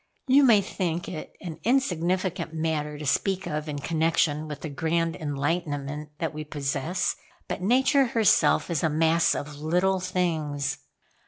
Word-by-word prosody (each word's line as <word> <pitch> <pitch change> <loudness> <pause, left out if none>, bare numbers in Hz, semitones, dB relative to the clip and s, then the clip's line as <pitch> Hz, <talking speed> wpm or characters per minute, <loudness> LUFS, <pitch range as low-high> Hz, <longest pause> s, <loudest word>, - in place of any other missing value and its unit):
You 270 +2 +5
may 225 -6 +6
think 175 -3 -3
it 155 -4 -6
an 165 -4 -7
insignificant 185 - 0
matter 155 -2 -2
to 150 - -7
speak 190 +7 0
of 150 +1 -3
in 145 - -3
connection 155 0 +1
with 150 -1 -7
the 160 - -4
grand 165 +3 0
enlightenment 150 0 -3
that 165 -2 -2
we 155 0 -5
possess; 145 +3 -2 0.3
but - - -4
Nature 265 +6 +3
herself 225 -5 +3
is 160 - 0
a 160 - +3
mass 160 +2 +3
of 145 0 -5
little 180 +5 +1
things. 160 -6 -1
160 Hz, 150 wpm, -26 LUFS, 150-185 Hz, 0.3 s, may